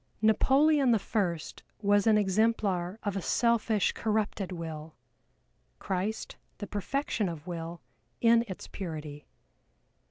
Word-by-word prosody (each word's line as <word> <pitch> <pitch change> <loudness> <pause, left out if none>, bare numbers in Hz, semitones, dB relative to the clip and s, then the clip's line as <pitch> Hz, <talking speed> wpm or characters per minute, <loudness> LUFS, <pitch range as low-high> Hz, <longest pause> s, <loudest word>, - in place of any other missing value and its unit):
Napoleon 270 +6 +4
the 230 - +5
First 190 -6 -2 0.2
was 205 0 +3
an 215 -1 +6
exemplar 200 -2 +1
of 205 -2 -2
a 195 - -1
selfish 230 -1 +2
corrupted 210 -3 -1
will, 160 -2 -6 0.8
CHRIST 195 +3 -3 0.2
the 205 - -5
perfection 210 0 -2
of 160 -2 -7
Will 170 -3 -6 0.4
in 230 0 +5
its 185 - -7
purity. 155 -6 -7
205 Hz, 115 wpm, -29 LUFS, 175-220 Hz, 0.8 s, an